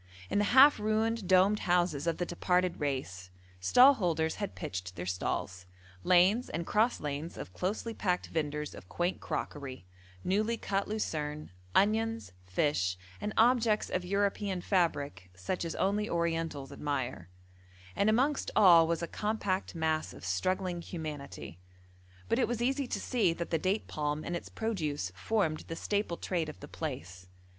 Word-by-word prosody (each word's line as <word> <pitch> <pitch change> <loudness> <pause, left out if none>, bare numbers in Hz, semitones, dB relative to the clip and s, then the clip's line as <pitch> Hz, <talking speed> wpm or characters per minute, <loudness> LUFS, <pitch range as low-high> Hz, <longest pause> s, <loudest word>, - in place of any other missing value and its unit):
In - - +2
the 205 - +3
half 265 +6 +7
ruined, 215 0 0
domed 190 +3 +5
houses 175 -4 +1
of 165 - +1
the 175 - -1
departed 180 +1 0
race, 130 - -3 0.3
stall 250 - +7
holders 165 - 0
had 205 -2 -4
pitched 90 0 -5
their 90 +1 -5
stalls: 95 0 -3 0.4
lanes 185 - +4
and 170 +1 -3
cross 220 +6 +2
lanes 150 +3 -4
of 90 - -8
closely 210 - -2
packed 180 -4 0
vendors 150 -2 -2
of 90 - -12
quaint 175 +2 -1
crockery, 135 -9 -5 0.4
newly 215 +5 +1
cut 195 -2 -1
lucerne, 150 - -3 0.2
onions, 225 - +2 0.2
fish, 95 -3 +1 0.2
and 210 - -2
objects 225 -2 +3
of 180 - -1
European 200 0 0
fabric 145 - 0
such 95 - -3
as 165 - -4
only 205 +2 0
Orientals 165 -5 -1
admire, 135 - -3 0.7
and 205 - +3
amongst 265 +6 +2
all 170 -5 +7
was 170 0 -1
a - - -2
compact 205 -2 -2
mass 160 -1 -1
of - - -10
struggling 180 - -1
humanity; 150 - -7 0.7
but 230 - +1
it - - +3
was 240 -1 -2
easy 265 +3 0
to - - -2
see 220 -9 +1
that 170 0 -5
the 165 - +2
date 190 +6 0
palm 150 0 -2
and 175 - -2
its 170 - -6
produce 155 - -2
formed 155 - 0
the 165 - -4
staple 200 -1 -1
trade 170 -4 -2
of 150 - -10
the 145 - -9
place. 90 - -6
175 Hz, 155 wpm, -31 LUFS, 145-210 Hz, 0.7 s, half